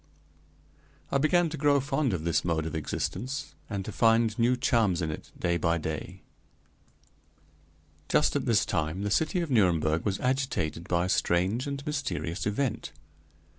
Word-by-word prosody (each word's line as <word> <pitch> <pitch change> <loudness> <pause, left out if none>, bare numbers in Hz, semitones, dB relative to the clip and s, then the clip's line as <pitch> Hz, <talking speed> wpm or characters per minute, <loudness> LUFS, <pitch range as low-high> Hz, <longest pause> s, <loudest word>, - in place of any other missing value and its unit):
I 140 - +2
began 170 +3 +3
to 155 - -5
grow 145 -1 +3
fond 135 -1 0
of 85 -5 -2
this 85 0 +1
mode 80 -2 0
of 80 - -4
existence, 125 - -3 0.2
and 100 -3 -3
to - - -5
find 115 0 +3
new 120 +2 +3
charms 110 -8 +2
in 80 -2 -1
it - - -8
day 85 0 0
by 85 0 +1
day. 80 -1 -5 1.9
Just - - +3
at - - -1
this - - +3
time 80 +5 -2
the 105 - -1
city 160 - +1
of 165 -4 -4
Nuremberg 85 -8 +2
was 100 -2 -1
agitated 125 - -1
by 85 0 +1
a - - -2
strange 95 +10 +1
and 140 0 -5
mysterious 100 - -3
event. 110 - -2
105 Hz, 160 wpm, -28 LUFS, 85-135 Hz, 1.9 s, began